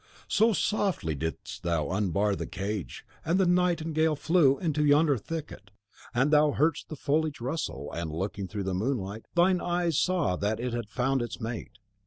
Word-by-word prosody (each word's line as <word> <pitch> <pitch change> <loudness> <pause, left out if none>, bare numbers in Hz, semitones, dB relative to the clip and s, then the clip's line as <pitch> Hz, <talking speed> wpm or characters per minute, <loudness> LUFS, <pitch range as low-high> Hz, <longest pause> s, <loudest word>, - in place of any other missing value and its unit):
So 220 +3 +4
softly 195 - 0
didst 80 +3 -5
thou 85 -3 -1
unbar 100 +1 +1
the - - -5
cage, 100 -2 -5 0.2
and 170 +4 +1
the 190 - +4
nightingale 165 -3 +2
flew 145 -2 +3
into 155 -4 0
yonder 145 0 +4
thicket; 145 -5 -6 0.4
and 135 +5 +2
thou 150 -1 +5
heardst 155 +2 +1
the 155 - -5
foliage 150 +1 0
rustle, 120 - -4
and, 85 -1 -4
looking 95 +4 -3
through 100 +1 -4
the 95 0 -2
moonlight, 105 0 -2
thine 180 +1 +4
eyes 175 -3 +1
saw 180 - +1
that 105 +2 -1
it 125 0 -3
had 120 -3 -3
found 130 +3 0
its 120 -1 -5
mate. 115 0 -6
135 Hz, 170 wpm, -28 LUFS, 100-160 Hz, 0.4 s, thou